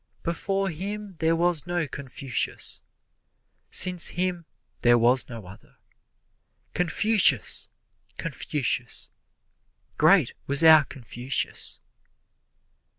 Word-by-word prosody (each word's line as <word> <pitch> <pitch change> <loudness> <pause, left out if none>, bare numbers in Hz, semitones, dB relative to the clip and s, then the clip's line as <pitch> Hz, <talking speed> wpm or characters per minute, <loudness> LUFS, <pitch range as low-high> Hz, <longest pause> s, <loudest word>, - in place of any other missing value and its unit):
Before 195 +3 -2
him 200 +4 -7
there 165 0 +1
was 175 -1 0
no 175 -2 -2
Confucius, 135 -3 -4 0.9
Since 180 -1 +4
him 175 -2 -2 0.3
there 120 0 +4
was 120 +3 +2
no 115 -5 -9
other. 95 +2 -16 1.0
Confucius! 180 - +3 0.5
Confucius! - - -3 0.9
Great - - +4
was 140 +3 +5
our 160 -2 +7
Confucius! 125 0 -3
165 Hz, 85 wpm, -25 LUFS, 130-180 Hz, 1.0 s, our